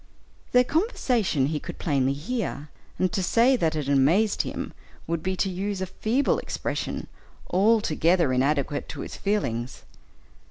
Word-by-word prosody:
Their 250 0 +6
conversation 250 - +1
he 150 +2 -1
could - - -8
plainly 135 -4 +1
hear, 155 - -4 0.3
and 185 -2 0
to 195 - 0
say 235 +8 +4
that 165 -9 0
it 150 -3 -2
amazed 155 +10 +3
him, - - -5 0.3
would 165 -1 -2
be 185 +2 -1
to 195 - 0
use 195 +1 -3
a 190 - -1
feeble 225 +8 0
expression, - - -3 0.5
altogether 180 - +3
inadequate 140 +2 0
to - - -6
his - - -7
feelings. 125 - -2
180 Hz, 145 wpm, -26 LUFS, 145-215 Hz, 0.5 s, Their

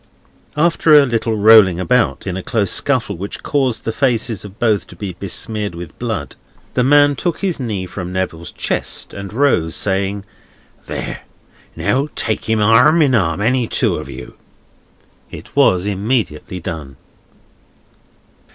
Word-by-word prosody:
After 160 -1 +5
a 140 - +4
little 115 -3 -1
rolling 105 -4 +6
about, 125 +5 +1
in 95 -2 -3
a 95 - -4
close 105 -2 0
scuffle - - +1
which 100 +3 -6
caused 135 -5 0
the 115 - -2
faces 115 -4 0
of 100 0 -11
both 110 -4 +1
to - - -13
be 95 +1 -6
besmeared 100 +2 -3
with 85 -4 -9
blood, - - -4 0.4
the 125 - +1
man 145 +2 +5
took 175 +4 -3
his 190 -6 -1
knee 105 -7 -3
from 90 -1 -6
Neville's 90 -3 -4
chest, - - -3
and 100 -1 -7
rose, 105 - +1
saying: 100 0 -1 0.6
"There! - - -5 0.5
Now 135 +3 0
take 110 - -2
him 110 -1 +1
arm 125 +10 +5
in 135 -3 +2
arm, 95 -5 +1
any 120 +2 +1
two - - 0
of - - -7
you!" - - -9 1.0
It - - -11
was 90 0 +3
immediately 100 -4 -2
done. 75 -5 -7
105 Hz, 150 wpm, -17 LUFS, 95-125 Hz, 1.0 s, rolling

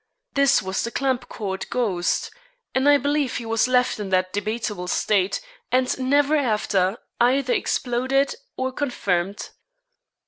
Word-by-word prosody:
This 275 -6 +4
was 190 0 -2
the 235 - -2
Clampcourt 235 -7 -2
ghost, 185 -9 0 0.4
and 265 +2 +3
I 290 - +7
believe 285 -1 0
he 235 - -5
was 225 +1 +2
left 250 -2 +2
in 205 -2 -4
that 185 0 +1
debatable 210 -3 -3
state, 195 +1 +1 0.3
and 255 0 +2
never 285 +3 +3
after 210 -7 +1 0.2
either 255 +2 +3
exploded 260 +3 0 0.2
or 260 0 -1
confirmed. 200 -9 -2
240 Hz, 130 wpm, -23 LUFS, 200-265 Hz, 0.4 s, I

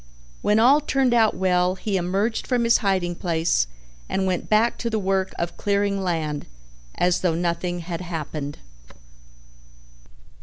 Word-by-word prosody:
When 210 - +2
all 270 +6 +6
turned 270 -4 +1
out 225 -2 +4
well 180 -1 +2
he 200 +1 -3
emerged 195 +5 -1
from 245 -2 +1
his 230 0 +4
hiding 190 -5 0
place 165 - 0 0.4
and 190 - 0
went 185 -2 -2
back 220 +2 +3
to 235 - -2
the 220 - -1
work 190 -1 0
of 170 0 -3
clearing 200 -1 0
land 160 -5 -2 0.5
as 180 0 +1
though 175 -3 +1
nothing 175 +1 -2
had 170 0 -5
happened. 155 -4 -5
185 Hz, 145 wpm, -23 LUFS, 175-215 Hz, 0.5 s, all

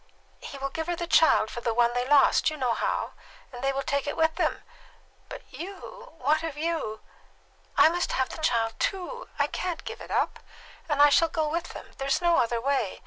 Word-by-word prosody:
"He 280 - -8
will 275 0 -4
give 320 +2 -4
her 350 - -1
the 345 - -4
child 320 -9 +4
for 240 - -6
the 230 -1 -1
one 240 0 +3
they 245 +1 -1
lost 290 +2 +5
you 310 - -6
know 250 -4 0
how! - - -2 0.4
And 245 +1 -8
they 275 - +2
will 275 0 -3
take 280 +1 -1
it - - -3
with 320 0 +3
them." - - -1 0.7
"But - - -8
you 395 +5 -9
what 300 +4 +1
have 320 -3 -5
you 310 -9 -2 0.4
" - - -35
"I - - +8
must 345 +2 -1
have 260 -1 0
the - - -8
child 230 -7 +1
too! 395 +6 -3
I - - +3
can't 355 -3 -4
give - - -7
it - - -10
up, - - 0 0.5
and 290 -1 +4
I 290 - +8
shall 330 +3 +4
go 315 -1 -1
with 335 +2 -3
them. - - -10
There's 275 0 +1
no 345 -1 +3
other 235 0 +1
way. 260 -5 -1
295 Hz, 220 wpm, -27 LUFS, 255-335 Hz, 0.7 s, I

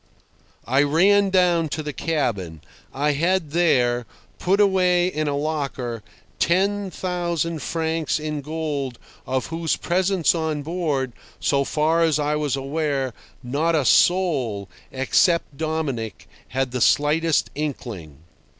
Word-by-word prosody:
I 135 +3 +3
ran 195 +7 +4
down 175 -4 +3
to 155 +1 -3
the 150 -1 -4
cabin. 105 - -2 0.3
I 145 +2 0
had 165 +2 0
there, 125 -8 +2 0.3
put 195 +3 +1
away 180 -3 +3
in 155 -4 -1
a 140 -1 0
locker, 140 -6 -3 0.4
ten 195 +3 +1
thousand 170 -3 -2
francs 160 -2 -1
in 150 -1 -3
gold 145 -4 -3 0.3
of 130 0 -1
whose 165 -1 0
presence 180 -2 +1
on 160 -3 -2
board, 150 -6 -2 0.3
so 140 -1 +2
far 155 +4 +1
as 160 -3 +3
I 150 0 0
was 150 -2 0
aware, 135 -2 -2 0.3
not 150 +7 0
a 150 -4 +1
soul, 135 - +2 0.2
except 145 +4 +2
Dominic 150 -7 -3 0.2
had 130 0 -2
the 125 -1 -3
slightest 155 +4 +2
inkling. 110 - -6
155 Hz, 125 wpm, -23 LUFS, 135-170 Hz, 0.4 s, ran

